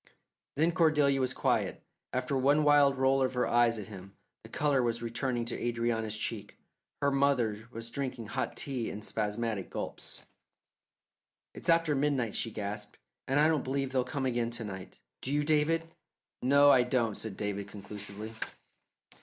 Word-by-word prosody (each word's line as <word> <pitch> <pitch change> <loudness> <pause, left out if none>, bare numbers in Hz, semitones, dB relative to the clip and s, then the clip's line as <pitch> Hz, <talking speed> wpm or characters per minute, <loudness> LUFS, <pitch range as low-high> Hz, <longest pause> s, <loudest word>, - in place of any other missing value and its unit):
Then 160 +4 +3
Cordelia 150 -5 +3
was 130 0 +1
quiet, - - 0 0.3
after 130 +2 -1
one 140 +3 +3
wild 145 -2 +5
roll 135 +1 +3
of 130 -1 +1
her 125 - +2
eyes 120 -1 +3
at 105 - -5
him. 95 -1 -11 0.3
The - - -13
colour 145 -3 +2
was 120 -1 -1
returning 120 +1 -1
to 115 - -2
Adrianna's 115 -2 -1
cheeks; 105 -1 -4 0.5
her 140 - +4
mother 125 -6 +1
was 115 -1 -7
drinking 130 -4 -4
hot - - -3
tea 130 -5 -2
in 105 - -7
spasmodic 105 -1 -2
gulps. - - -6 1.3
"It's - - -4
after 165 -2 +4
midnight," 135 -5 +1
she 115 - -1
gasped, 105 0 -5 0.3
"and 135 +2 +2
I 150 - +6
don't 155 -4 +1
believe 135 0 -1
they'll 130 -1 +2
come 135 +1 -3
again 120 -2 0
to 120 -1 -4
night. 95 -3 -8 0.2
Do 130 - -2
you, 145 +1 +2
David?" 155 +2 +2 0.6
"No, 140 +2 +6
I 130 - +6
don't," 120 -3 +1
said 105 -1 -6
David 100 -1 -3
conclusively. 100 +2 -8
125 Hz, 160 wpm, -31 LUFS, 110-140 Hz, 1.3 s, I